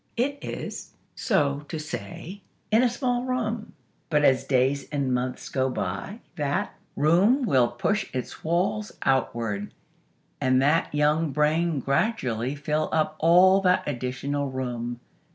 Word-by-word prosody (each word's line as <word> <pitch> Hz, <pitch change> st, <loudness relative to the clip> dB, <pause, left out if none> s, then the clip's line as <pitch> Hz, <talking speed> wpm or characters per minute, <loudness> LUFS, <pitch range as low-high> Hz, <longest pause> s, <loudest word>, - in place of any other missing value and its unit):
It 280 Hz, +4 st, 0 dB
is, -, -, -6 dB, 0.2 s
so 145 Hz, -, +1 dB
to 160 Hz, -, -3 dB
say, 170 Hz, +4 st, -7 dB, 0.3 s
in 220 Hz, +2 st, +5 dB
a 250 Hz, -, +4 dB
small 245 Hz, 0 st, -1 dB
room. 235 Hz, -4 st, -2 dB, 0.4 s
But, 150 Hz, -2 st, +2 dB
as 130 Hz, -1 st, +4 dB
days 135 Hz, +1 st, +1 dB
and 140 Hz, -3 st, -1 dB
months 125 Hz, +1 st, -2 dB
go 130 Hz, -1 st, 0 dB
by, 100 Hz, -, -4 dB, 0.2 s
that 145 Hz, -2 st, -1 dB, 0.2 s
room 190 Hz, -, +4 dB
will 130 Hz, -, +4 dB
push 205 Hz, -, -1 dB
its 130 Hz, -1 st, -5 dB
walls 200 Hz, +6 st, 0 dB
outward, 115 Hz, -6 st, 0 dB, 0.7 s
and 130 Hz, 0 st, +3 dB
that 150 Hz, +5 st, +2 dB
young 150 Hz, +2 st, +2 dB
brain 155 Hz, +2 st, +1 dB
gradually 135 Hz, -, 0 dB
fill 150 Hz, +2 st, -1 dB
up 155 Hz, -1 st, +1 dB
all 185 Hz, +4 st, +6 dB
that 185 Hz, -1 st, +3 dB
additional 140 Hz, +2 st, -2 dB
room. 120 Hz, -2 st, -4 dB
150 Hz, 135 wpm, -26 LUFS, 130-190 Hz, 0.7 s, all